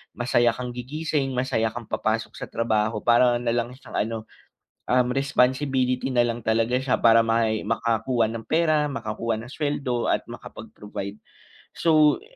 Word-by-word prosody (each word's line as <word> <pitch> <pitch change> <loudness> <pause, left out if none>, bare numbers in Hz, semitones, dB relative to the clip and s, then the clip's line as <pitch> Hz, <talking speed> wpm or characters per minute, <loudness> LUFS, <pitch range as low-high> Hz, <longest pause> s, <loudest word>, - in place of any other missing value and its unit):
masaya 120 -1 +2
kang 125 -1 -5
gigising, 135 +2 -2
masaya 125 -3 0
kang 120 +1 -6
papasok 110 0 -1
sa - - -5
trabaho, 110 -1 -1
parang 120 0 +4
nalang 120 +1 -1
siyang 135 - -6
ano, 115 +1 -1 0.7
um, 125 0 +3
responsibility 130 -1 +1
nalang 120 -2 +1
talaga 115 +2 +1
siya 130 -1 +1
para 115 0 +6
may 115 -1 +1
makakuha 115 +2 0
ng 115 -1 -6
pera, 155 -2 +2
makakuha 115 -2 -3
ng 120 - -11
sweldo 140 -5 -1
at - - 0
makapag-provide. 105 0 -8 0.5
So, 155 - +3
120 Hz, 135 wpm, -24 LUFS, 115-130 Hz, 0.7 s, para